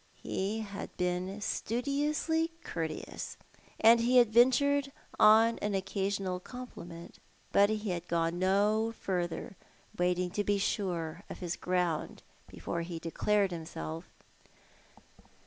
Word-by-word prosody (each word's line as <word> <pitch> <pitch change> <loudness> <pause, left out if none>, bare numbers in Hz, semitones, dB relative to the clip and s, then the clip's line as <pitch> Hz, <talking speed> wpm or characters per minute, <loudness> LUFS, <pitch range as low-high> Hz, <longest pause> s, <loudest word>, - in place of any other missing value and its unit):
He 205 +4 -2
had 200 -2 -6
been 180 +3 -2
studiously 295 +9 0
courteous, 160 -2 -5 0.4
and 230 +1 +7
he 245 +2 +3
had 235 -3 +5
ventured 275 +4 +4 0.3
on 220 +2 +6
an 205 -1 -1
occasional 195 -1 -1
compliment; 180 -7 -10 0.3
but 200 +1 +5
he 215 -2 -1
had 175 0 -4
gone 165 +1 0
no 210 +4 +2
further, 175 -1 -3 0.4
waiting 180 0 +1
to 205 - -1
be 205 0 +1
sure 175 -5 -2
of - - -7
his 175 -2 -3
ground 180 -3 -1 0.2
before 170 - -4
he 170 0 -5
declared 195 +4 +1
himself. 160 0 -6
195 Hz, 115 wpm, -31 LUFS, 175-225 Hz, 0.4 s, and